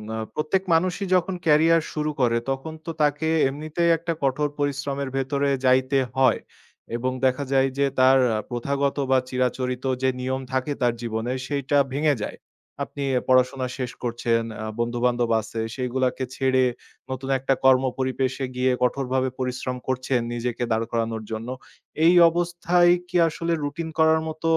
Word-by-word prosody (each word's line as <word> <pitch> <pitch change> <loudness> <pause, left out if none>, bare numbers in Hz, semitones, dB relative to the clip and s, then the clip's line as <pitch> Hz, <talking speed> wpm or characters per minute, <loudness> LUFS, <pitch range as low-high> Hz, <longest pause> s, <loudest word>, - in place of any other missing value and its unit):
আ - - -3 0.2
প্রত্যেক 155 +5 0
মানুষই 180 +4 +1
যখন 180 +1 +1
ক্যারিয়ার 160 +1 +5
শুরু 150 0 -1
করে 115 -1 +3
তখন 135 +4 -4
তো 165 - -3
তাকে 150 +1 +1 0.2
এমনিতেই 155 +4 -1
একটা 165 +1 -3
কঠোর 140 +2 +1
পরিশ্রমের 140 -1 -2
ভেতরে 140 +1 0 0.2
যাইতে 130 +2 +3 0.2
হয়। 130 -1 +4 0.6
এবং 130 +2 -1
দেখা 130 +2 +1
যায় 135 0 +4
যে 140 - +3
তার 130 +1 +6 0.2
আ - - -1
প্রথাগত 140 +4 -1
বা 130 - +6
চিরাচরিত 125 0 -1 0.2
যে 130 - +3
নিয়ম 130 +1 -2
থাকে 130 +2 -1
তার 120 -1 +3
জীবনে 115 +1 -2
সেইটা 145 0 0 0.2
ভেঙে 145 0 +2
যায়। - - -5 0.5
আপনি 140 0 -6 0.2
পড়াশোনা 130 0 +3
শেষ 125 -2 -3
করছেন, 120 -1 0 0.2
অ্যা 110 - -5
বন্ধু-বান্ধব 120 0 0
আছে 110 +1 -7 0.2
সেগুলাকে 130 0 -1
ছেড়ে 130 -1 +2 0.5
নতুন 130 +1 -5
একটা 135 +1 +1
কর্ম 130 0 +6 0.2
পরিবেশে 130 0 -1
গিয়ে 130 0 +2
কঠোরভাবে 130 0 0
পরিশ্রম 125 0 -3
করছেন, 130 0 0
নিজেকে 120 0 -3
দাঁড় 110 +1 +1
করানোর 115 -1 -2
জন্য। 110 +2 -4 0.6
এই 175 - +7 0.2
অবস্থায় 175 +1 +2 0.2
কি 180 - 0
আসলে 170 +1 -2
রুটিন 155 +3 -4
করার 160 0 +5
মত 160 +1 -7
130 Hz, 150 wpm, -24 LUFS, 125-150 Hz, 0.6 s, এই